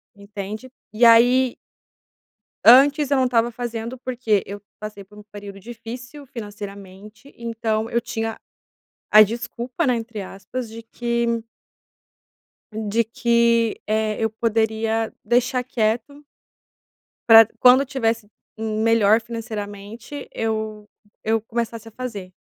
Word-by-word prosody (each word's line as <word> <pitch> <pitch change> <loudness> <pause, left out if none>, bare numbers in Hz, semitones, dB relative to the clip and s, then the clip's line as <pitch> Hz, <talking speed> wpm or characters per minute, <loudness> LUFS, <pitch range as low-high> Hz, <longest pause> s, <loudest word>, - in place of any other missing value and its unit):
Entende? 205 +4 -8 0.2
E 235 +2 +4
aí 245 +2 +5 1.1
antes 275 +5 +7
eu 280 - +3
não 260 - +3
estava 240 -1 +2
fazendo 235 +1 -5
porque 240 -5 0
eu 205 +1 -8 0.2
passei 210 -2 -8
por 210 +2 -19
um 210 - -12
período 200 -1 -9
difícil 240 +6 -9
financeiramente, 205 +1 -10
então 225 -1 -2
eu 235 - +1
tinha 225 -2 -4 0.7
a 215 +1 +9
desculpa, 240 - -1
né, 250 -2 +2
entre 225 -2 -5
aspas, 220 +5 -7
de 225 +1 -9
que 235 +1 -2
m 230 -1 -1 1.3
de 220 +1 0
que 235 0 +1
eh, 215 0 0
eu 220 - +2
poderia 220 0 0
deixar 245 +2 +2
quieto 245 +4 -2 1.1
pra 225 0 +11
d 220 - -13
quando 255 +2 +6
tivesse 230 -5 -1 0.3
m 220 0 -2
melhor 225 -1 +4
financeiramente 225 +3 -7
eu 215 -1 -3 0.4
eu 220 0 +1
começasse 230 0 -4
a - - -11
fazer 205 -7 -7
225 Hz, 125 wpm, -22 LUFS, 215-240 Hz, 1.3 s, pra